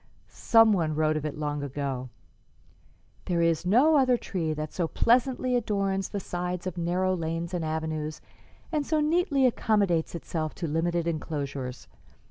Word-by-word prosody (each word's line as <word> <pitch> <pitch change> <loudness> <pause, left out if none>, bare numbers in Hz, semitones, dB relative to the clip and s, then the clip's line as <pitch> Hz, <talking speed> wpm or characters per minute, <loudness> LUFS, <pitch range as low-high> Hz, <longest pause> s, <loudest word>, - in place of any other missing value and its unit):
Some 225 -2 +5
one 160 -5 0
wrote 155 0 +2
of 155 0 -2
it 150 - -6
long 145 -1 -2
ago: 135 -2 -4 1.2
'There 170 -2 +1
is 165 +1 +1
no 280 +10 +5
other 255 -3 +4
tree 170 -8 -3
that 155 0 -4
so 175 -3 -1
pleasantly 250 +5 +2
adorns 195 -4 0
the 205 - -3
sides 180 -1 -4
of 185 - -3
narrow 180 +2 0
lanes 165 +1 -3
and 175 -2 -1
avenues, 155 -1 -3 0.5
and 305 -3 0
so 310 +2 0
neatly 300 -3 +2
accommodates 200 -9 +1
itself 160 -2 -4
to 175 - -4
limited 165 +2 0
enclosures. 140 -5 -4
170 Hz, 150 wpm, -27 LUFS, 155-215 Hz, 1.2 s, Some